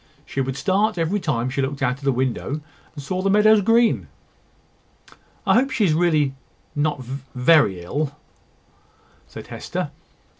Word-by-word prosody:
She 135 - -3
would 135 0 -3
start 200 +4 +1
every 170 +5 0
time 130 -8 -1
she 135 - -1
looked 135 0 -3
out 125 +1 0
of 140 - -10
her 135 - +4
window, 130 +3 -2 0.3
and 145 - -7
saw 185 +6 -2
the 195 - +1
meadows 210 +1 +5
green." 230 +3 +3 1.4
"I - - +4
hope 270 +3 +3
she 260 -5 +1
is 160 - +3 0.8
not 145 -2 -1
really 135 +3 -5 0.2
very 125 - +4
ill," 145 - -2 1.2
said - - -10
Hester. - - -5
150 Hz, 150 wpm, -22 LUFS, 135-200 Hz, 1.4 s, meadows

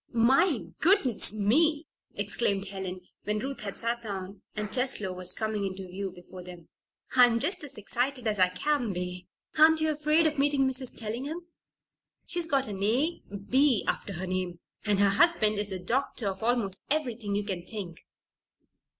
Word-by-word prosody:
"My 265 +6 +3 0.2
goodness 315 - +5
me!" 295 +10 +2 0.3
exclaimed 200 -1 0
Helen, 190 -2 -5 0.2
when 210 0 0
Ruth 270 +5 -4
had 200 -2 -5
sat 235 +1 -1
down 195 -3 -6
and 210 -2 -4
Cheslow 250 -7 +1
was 180 0 0
coming 215 +1 -3
into 190 -1 -5
view 190 +2 -5
before 180 +1 -12
them. 175 -2 -12 0.5
"I'm 245 -2 +6
just 350 - +2
as 285 - -4
excited 245 +4 -2
as 210 -2 0
I 185 -1 +5
can 240 +3 -1
be. 180 0 -5 0.3
Aren't 320 +1 +7
you 315 0 +1
afraid 305 +2 +2
of 300 -2 0
meeting 280 -1 +2
Mrs. 260 -1 -4
Tellingham? 265 +10 -4 0.8
She's 345 -2 0
got 275 -5 +1
an 200 -2 -5
A. 275 +11 +1 0.3
B. 265 -3 +3
after 200 - -2
her 185 +2 -4
name. 185 -1 -3 0.3
And 205 -2 +2
her 200 0 +5
husband 215 - +3
is 205 -1 -1
a 190 - -2
doctor 230 +2 -1
of 190 0 -6
almost 225 -5 +1
everything 240 -9 -1
you 205 - 0
can 190 -4 -4
think!" 180 -2 -7
220 Hz, 165 wpm, -28 LUFS, 195-275 Hz, 0.8 s, Aren't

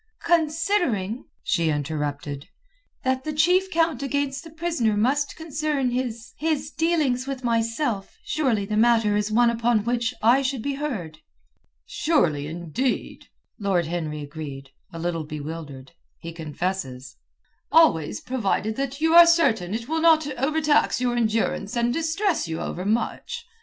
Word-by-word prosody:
"Considering," 315 - +1 0.2
she 165 -1 +1
interrupted, 145 -1 -3 0.6
"that 260 0 0
the 310 - -3
chief 360 +5 +3
count 325 -6 +1
against 275 0 -2
the 325 - -11
prisoner 320 -10 0
must 275 +7 +1
concern 300 -4 -1
his... 240 -2 -4
his 310 -1 -1
dealings 300 -6 +1
with 270 -2 -4
myself, 230 -2 -1
surely 245 -10 0
the 210 - -3
matter 225 -2 +4
is 210 +1 0
one 235 +2 +4
upon 230 -2 +1
which 235 0 0
I 245 +5 +5
should 260 -3 -2
be 280 - -1
heard." 225 - -4 0.7
"Surely, 155 - +1
indeed," 175 - -3 0.3
Lord 195 -4 +1
Henry 155 -3 -3
agreed, 140 -3 -8 0.2
a 165 - -8
little 165 -1 -2
bewildered, 150 -3 -7 0.3
he 165 0 -8
confesses, 155 -5 -4 0.5
"always 160 - +4
provided 255 +3 -2
you 320 +1 +2
are 340 0 +10
certain 230 - +2
it 230 +1 -5
will 320 +2 -1
not 320 -2 +5
overtax 300 +1 +2
your 245 -1 0
endurance 220 -2 0
and 235 0 +1
distress 330 - 0
you 160 0 -4
overmuch. 205 +6 -2
235 Hz, 135 wpm, -24 LUFS, -, 0.7 s, are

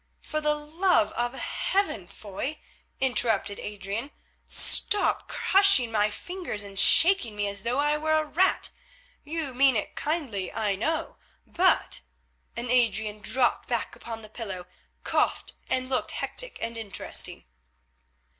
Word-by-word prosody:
"For 310 0 -3
the 300 0 +1
love 305 - +1
of 240 +2 -3
Heaven, 380 - -1
Foy," 210 +10 -6 0.4
interrupted 225 -6 0
Adrian, 210 +5 -5 0.4
"stop 415 -1 +3
crushing 385 - +5
my 210 -1 +2
fingers 350 - -5
and 195 -1 -6
shaking 325 - +5
me 205 -1 -1
as 200 0 -4
though 235 +4 -1
I 295 +1 +1
were 315 +1 +1
a 310 - 0
rat. 360 +5 +1 0.5
You 310 -3 -4
mean 265 0 +4
it 210 - -3
kindly, 265 - -2
I 215 -3 0
know, 315 - -2 0.3
but—" 375 +1 +2 0.5
and 235 +1 -4
Adrian 220 -3 +1
dropped 245 +4 +1
back 235 -2 -2
upon 225 -1 -8
the 215 - -10
pillow, 195 -6 -7 0.4
coughed - - -1 0.2
and 255 0 0
looked 315 +5 -2
hectic - - -5
and 230 0 -5
interesting. 205 - 0
245 Hz, 135 wpm, -26 LUFS, 210-310 Hz, 0.5 s, crushing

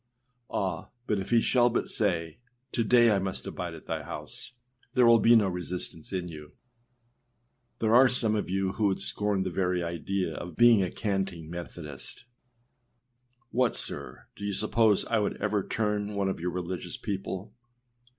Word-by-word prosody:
â - - -7
Ah! 95 -2 -2 0.2
but 105 -4 0
if 95 - -5
he 120 - +5
shall 120 +1 +3
but 120 - -1
say, 85 -6 0 0.3
âTo 115 -3 0
day 120 -2 +6
I 100 - +3
must 95 0 -3
abide - - -5
at - - -13
thy - - -3
house,â - - -6 0.4
there 125 -2 +5
will 115 -1 +7
be 115 +3 +6
no 105 -3 +5
resistance 90 -2 -5
in 90 -2 -2
you. 75 -3 -10 1.2
There 110 0 +1
are 130 +2 +7
some 115 -3 +2
of 105 - -2
you 95 0 0
who 105 0 +1
would 95 - 0
scorn 105 -2 0
the 95 - -3
very 90 0 0
idea 85 +1 -2
of 85 +2 -7
being 120 -3 +6
a 90 - 0
canting 95 -6 -3
Methodist; 85 - -8 1.3
âWhat, 125 -1 +2
sir! 60 - -2
do - - -10
you 100 0 -1
suppose 110 0 +3
I 115 - +1
would 105 - -1
ever 105 -1 0
turn 105 0 -2
one 100 -1 0
of 95 - -3
your 90 +2 -1
religious 90 0 -4
people? 95 0 -5
100 Hz, 175 wpm, -28 LUFS, 90-110 Hz, 1.3 s, will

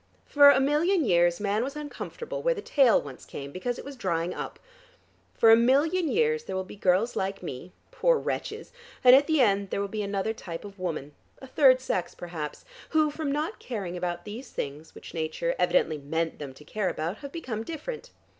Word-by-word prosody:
For 285 -1 +7
a 275 -2 +5
million 305 +5 +2
years 175 -3 +3
man 205 +2 0
was 275 +3 -4
uncomfortable 300 +10 -6
where - - +2
the - - -5
tail 265 -6 +4
once 130 - -10
came, 140 0 -8
because 240 - -3
it - - -9
was 280 0 -8
drying 175 -6 -1
up. - - -6 0.8
For 225 - +6
a - - +10
million 290 +9 +3
years 465 +3 +1
there - - -5
will 190 - -1
be 185 - -11
girls 195 +4 +2
like 195 0 -2
me, 165 +3 -7 0.2
poor - - +3
wretches, - - -4 0.3
and 250 0 +9
at 280 +2 +4
the 315 -3 +3
end 200 -4 +2
there - - -2
will 200 - -1
be 215 +2 -4
another 200 +1 -1
type 170 -4 -8
of 200 -1 -11
woman, 155 -5 -4 0.2
a - - -11
third 260 -1 +5
sex, 185 -8 -2
perhaps, 165 - -6 0.2
who 310 -2 +2
from 295 -1 -3
not 305 +8 -2
caring 200 -8 -5
about 175 -1 -3
these 225 +5 -8
things 145 +3 -6
which - - -11
Nature 165 - -2
evidently 155 -2 +2
meant 160 +3 -2
them 145 -3 -6
to 150 - -15
care 205 +1 -1
about 165 +4 -3
have 280 -1 -9
become 250 -10 -4
different. 335 - -6
215 Hz, 200 wpm, -27 LUFS, 175-285 Hz, 0.8 s, a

